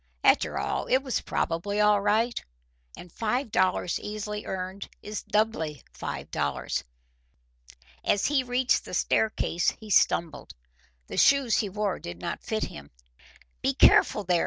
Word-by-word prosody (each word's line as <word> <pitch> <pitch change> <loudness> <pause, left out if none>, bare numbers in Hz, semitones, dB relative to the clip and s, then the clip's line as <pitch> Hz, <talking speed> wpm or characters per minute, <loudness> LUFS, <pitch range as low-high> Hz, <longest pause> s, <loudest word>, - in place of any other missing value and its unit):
After - - +3
all - - -2
it 260 +1 +2
was 260 -3 -1
probably 200 +5 -2
all 210 -1 +4
right, 220 +4 +1 0.5
and 175 - -11
five 230 - -2
dollars 185 -2 +1
easily 210 0 -5
earned 190 +1 -5
is 210 0 -5
doubly 185 - -1
five - - -6
dollars. 70 -2 -2 1.2
As 200 - +2
he 285 -1 +3
reached 250 +1 +1
the - - -6
staircase 195 -5 +1
he 215 -1 -9
stumbled. 170 -3 +1 0.5
The - - -7
shoes 275 -5 +4
he 205 - -1
wore 205 -1 -2
did 85 0 -8
not - - -5
fit 220 -1 -2
him. 70 -1 -7 0.7
"Be - - +1
careful, 210 - +5
there!" 175 -2 +2
210 Hz, 140 wpm, -27 LUFS, 180-220 Hz, 1.2 s, careful